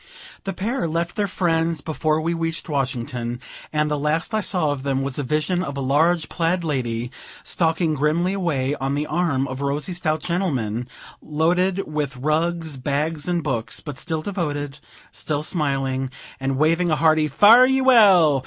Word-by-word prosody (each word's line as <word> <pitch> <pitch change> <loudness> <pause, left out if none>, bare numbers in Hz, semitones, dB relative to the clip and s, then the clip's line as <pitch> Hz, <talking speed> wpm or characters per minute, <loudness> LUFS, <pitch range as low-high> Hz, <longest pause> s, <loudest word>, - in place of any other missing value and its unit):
The 195 - -2
pair 220 +4 -2
left 170 +2 -2
their 205 -1 0
friends 165 -4 0
before 155 0 0
we 165 +2 0
reached 165 0 -3
Washington; 125 -4 -2 0.3
and 150 0 0
the 150 - 0
last 155 +8 -1
I 215 - +2
saw 175 -8 +1
of 145 -2 -3
them 135 -1 -1
was 135 +1 -2
a - - -1
vision 155 +7 0
of 140 -5 -5
a - - -2
large 155 +5 +2
plaid 170 +1 0
lady, 120 -6 -2 0.3
stalking 165 -1 0
grimly 155 +6 +1
away, 150 -8 -1
on 135 +1 0
the 145 +1 -1
arm 150 -4 0
of 130 +1 -6
a - - -1
rosy, 145 +5 -2
stout 155 -3 -1
gentleman, 125 - -1 0.3
loaded 180 +5 +1
with 150 -3 -3
rugs, 160 +2 -1
bags, 145 +4 -2
and 175 -2 0
books, 120 -6 -1
but 145 -3 -7
still 160 -1 -3
devoted, 145 -7 -3 0.3
still 150 -1 -3
smiling, 135 -5 -1 0.3
and 135 0 -1
waving 165 +4 +2
a 155 - +3
hearty 155 0 +3
"Fare 225 - +7
ye 265 0 +2
well! 195 - +6
155 Hz, 170 wpm, -22 LUFS, 140-175 Hz, 0.3 s, Fare